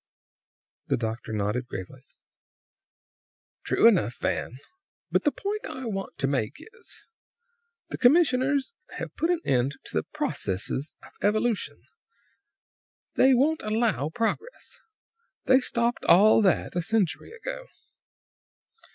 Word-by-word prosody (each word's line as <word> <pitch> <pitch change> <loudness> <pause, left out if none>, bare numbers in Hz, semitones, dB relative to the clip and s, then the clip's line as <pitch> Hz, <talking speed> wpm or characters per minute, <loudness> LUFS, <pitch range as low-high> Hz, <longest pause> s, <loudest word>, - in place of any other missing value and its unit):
The - - +1
doctor 115 0 -4
nodded 110 +4 -1
gravely. 110 +6 -8 1.6
"True - - +4
enough, 175 - +2
Van. 125 - -2 0.5
But - - +1
the 295 - +4
point 415 +5 -4
I 260 - -7
want 195 -4 -5
to 135 - 0
make 130 -6 -1
is, 460 +1 -12 0.9
the - - -6
commissioners 270 - +3 0.2
have - - -6
put 330 - 0
an 350 -2 +1
end 130 +2 +1
to - - -11
the - - +1
processes 110 +10 -3
of - - -14
evolution. 210 - 0 1.3
They 260 0 +5
won't 305 +6 +2
allow 215 - 0
progress. 230 - -3 0.7
They 260 0 +6
stopped 235 -2 -1
all 210 +5 +6
that 190 -4 +1
a 175 - +1
century 205 - 0
ago. - - -7
220 Hz, 115 wpm, -26 LUFS, -, 1.6 s, They